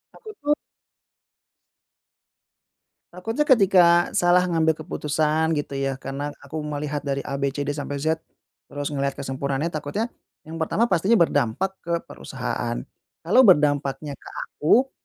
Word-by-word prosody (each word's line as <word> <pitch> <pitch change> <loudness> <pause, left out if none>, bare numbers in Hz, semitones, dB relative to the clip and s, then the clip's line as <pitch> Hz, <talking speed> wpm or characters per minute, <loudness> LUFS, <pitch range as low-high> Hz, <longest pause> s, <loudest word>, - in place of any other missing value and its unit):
Aku 445 - -12
tuh 295 +1 +2 2.6
Takutnya 225 +11 -2
ketika 180 -7 +5
salah 175 +1 +4
ngambil 160 -3 +2
keputusan 155 0 0
gitu 140 -2 -3
ya, 135 0 -1
karena 135 +2 -5 0.2
aku 150 +3 -6
melihat 150 -1 -3
dari 140 0 -1
A, 140 0 -4
B, 140 - +1
C, 145 - -1
D 145 - -1
sampai 145 -1 -4
Z, 160 +1 +1 0.5
terus 145 0 -4
ngelihat 140 -1 -1
kesempurnaannya, 140 +4 -2
takutnya, 155 +10 -3 0.3
mmm, 160 +1 -8
pertama 215 +8 +1
pastinya 190 +6 +3
berdampak 165 - +2
ke 170 0 -4
perusahaan. - - -4 0.5
Kalau 205 +10 +5
berdampaknya 145 -3 +3
ke - - -11 0.2
aku, 250 - +2
155 Hz, 130 wpm, -24 LUFS, 145-180 Hz, 2.6 s, ketika